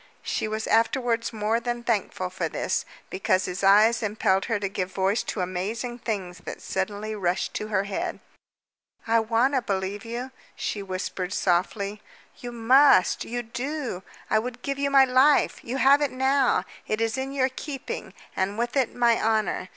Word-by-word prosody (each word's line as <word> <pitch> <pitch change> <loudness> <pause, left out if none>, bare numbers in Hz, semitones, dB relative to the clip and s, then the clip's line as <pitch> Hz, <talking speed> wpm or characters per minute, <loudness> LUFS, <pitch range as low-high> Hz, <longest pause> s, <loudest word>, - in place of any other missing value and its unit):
She - - -2
was 220 +1 -3
afterwards 230 +1 +1
more 220 +1 0
than 240 0 -3
thankful 200 -5 -1
for 185 - -2
this, - - -1 0.3
because 185 0 +1
his 180 +2 -4
eyes 215 +4 +5
impelled 205 -3 +1
her 225 -3 -1
to 200 - -1
give 190 -1 -3
voice 195 +4 +1
to 200 - -4
amazing 210 +7 -3
things 195 -7 -4
that - - -8
suddenly 205 +3 -3
rushed 185 -4 -1
to 215 - -3
her 200 -3 +1
head. 200 -1 -3 0.9
"I 230 0 +3
want 230 +5 +2
to 260 - +2
believe 195 -1 -3
you," 240 +3 -5 0.2
she 205 - -3
whispered 185 -1 -4
softly. 200 +3 0 0.4
"You 245 - -7
must 240 -2 +4
you 240 +1 -3
do! 250 -2 -4 0.3
I 215 - +3
would 245 +2 -6
give 275 0 -3
you 280 0 +1
my 275 -1 +6
life. 260 +3 +3
You 250 +3 -3
have 275 +2 +5
it 290 - +2
now. 265 0 +2 0.2
It 215 - -1
is 225 0 0
in 265 +1 -3
your 265 -1 +1
keeping, 270 +1 -6 0.2
and 195 +2 -1
with 240 +2 -2
it 265 -4 +1
my 235 -1 +3
honor. 215 -4 0
225 Hz, 175 wpm, -26 LUFS, 195-250 Hz, 0.9 s, my